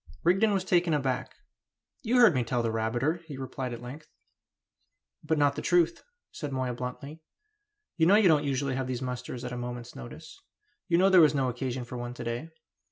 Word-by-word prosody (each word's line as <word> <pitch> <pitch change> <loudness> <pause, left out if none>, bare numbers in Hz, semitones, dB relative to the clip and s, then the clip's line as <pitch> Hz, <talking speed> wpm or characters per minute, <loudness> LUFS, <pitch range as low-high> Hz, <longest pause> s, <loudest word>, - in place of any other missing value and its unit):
Rigden 195 +5 +3
was 195 -2 0
taken 175 -3 +2
aback. 135 -3 -2 0.7
"You 245 0 +1
heard 240 -7 +7
me 130 -3 +1
tell 120 +1 -1
that 115 - 0
rabbiter," 120 +9 -1
he 145 -4 -7
replied 130 -1 -5
at 120 0 -7
length. 145 +5 -9 1.2
"But 155 +1 0
not 145 -1 +3
the - - -4
truth," 170 -1 +2 0.3
said 145 -2 -6
Moya 130 -2 -2
bluntly. 130 +6 -7 0.8
"You 160 -1 +4
know 195 - +6
you 210 -2 +5
don't 155 -3 +4
usually 140 -1 -1
have 130 0 -2
these 130 -1 -3
musters 125 0 -5
at 125 - -5
a - - -4
moment's 120 0 -6
notice; 60 -1 -11 0.5
you 170 - +3
know 190 +2 +4
there 185 -2 +8
was 155 -2 +5
no 135 -2 +1
occasion 125 0 -4
for 125 +1 -7
one 120 0 -6
to - - -7
day. 120 +7 -4
135 Hz, 200 wpm, -28 LUFS, 125-165 Hz, 1.2 s, there